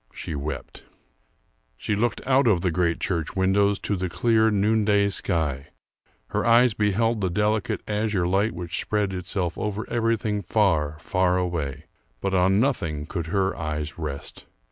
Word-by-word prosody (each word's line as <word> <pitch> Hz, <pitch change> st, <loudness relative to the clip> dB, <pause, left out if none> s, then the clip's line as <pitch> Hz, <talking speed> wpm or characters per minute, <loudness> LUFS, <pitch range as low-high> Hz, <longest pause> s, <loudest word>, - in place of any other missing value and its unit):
She -, -, -5 dB
wept. 75 Hz, +1 st, -6 dB, 0.9 s
She 105 Hz, -, -1 dB
looked 115 Hz, +4 st, -1 dB
out 135 Hz, 0 st, +3 dB
of 95 Hz, -6 st, +3 dB
the 90 Hz, -, +1 dB
great 85 Hz, -1 st, 0 dB
church 85 Hz, -4 st, -2 dB
windows 100 Hz, +2 st, +3 dB
to 105 Hz, -, -1 dB
the 95 Hz, -1 st, -2 dB
clear 110 Hz, +3 st, +3 dB
noonday 105 Hz, -1 st, +2 dB
sky; 75 Hz, -7 st, -2 dB, 0.6 s
her -, -, -1 dB
eyes 120 Hz, 0 st, +5 dB
beheld 110 Hz, +2 st, +1 dB
the 95 Hz, -, +1 dB
delicate 105 Hz, +3 st, 0 dB
azure 105 Hz, -4 st, 0 dB
light 100 Hz, +4 st, +1 dB
which 85 Hz, 0 st, -4 dB
spread 105 Hz, -2 st, -1 dB
itself 90 Hz, -1 st, -3 dB
over 105 Hz, +1 st, -3 dB
everything 115 Hz, -3 st, 0 dB
far, 80 Hz, -7 st, +1 dB
far 90 Hz, +2 st, +1 dB
away, 80 Hz, -5 st, -3 dB, 0.3 s
but 100 Hz, -1 st, -2 dB
on 95 Hz, +2 st, +3 dB
nothing 85 Hz, -, 0 dB
could 85 Hz, 0 st, -4 dB
her 95 Hz, +2 st, 0 dB
eyes 75 Hz, 0 st, -4 dB
rest. 75 Hz, -3 st, -6 dB
95 Hz, 150 wpm, -25 LUFS, 85-105 Hz, 0.9 s, eyes